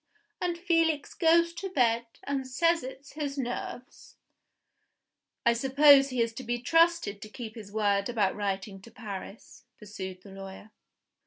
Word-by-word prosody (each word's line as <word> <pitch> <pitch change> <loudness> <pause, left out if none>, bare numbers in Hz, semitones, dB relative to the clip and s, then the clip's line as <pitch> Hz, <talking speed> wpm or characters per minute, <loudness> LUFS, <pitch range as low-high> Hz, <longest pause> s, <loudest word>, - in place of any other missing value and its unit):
And 350 -1 -1
Felix 330 -4 +1
goes 335 0 +3
to 385 +3 -5
bed, 235 -7 +2 0.2
and 275 -2 -3
says 335 +6 +2
it's 265 +2 -9
his 290 -2 -4
nerves." 245 0 -6 1.3
"I 235 - +5
suppose 275 +3 +6
he 250 -3 +1
is 230 0 -4
to 260 - -7
be 240 0 -1
trusted 330 - +2
to 215 - -9
keep 220 -1 -8
his 215 -4 -10
word 200 -1 +1
about 210 -5 +1
writing 195 -1 -3
to 230 - -13
Paris?" 210 -2 -9
pursued 190 -3 -8
the 200 - -13
lawyer. 195 +2 -10
245 Hz, 150 wpm, -29 LUFS, 210-295 Hz, 1.3 s, suppose